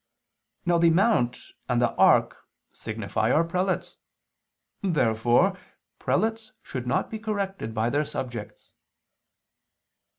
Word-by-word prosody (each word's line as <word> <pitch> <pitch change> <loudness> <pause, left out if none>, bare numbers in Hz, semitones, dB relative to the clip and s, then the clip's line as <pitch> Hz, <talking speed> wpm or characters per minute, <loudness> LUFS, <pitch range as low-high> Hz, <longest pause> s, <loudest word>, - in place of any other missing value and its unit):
Now 175 -1 +3
the 170 0 +5
mount 165 - +2 0.3
and 120 -1 +2
the 120 -1 +2
ark - - +4 0.4
signify - - -2
our 165 - +4
prelates. 180 +3 -2 0.8
Therefore 130 - +2 0.4
prelates 225 0 -1
should 125 -2 -6
not - - 0
be 220 - -4
corrected 200 - -3
by 110 +2 0
their 150 +2 +1
subjects. 120 -6 -7
165 Hz, 105 wpm, -26 LUFS, 120-195 Hz, 0.8 s, the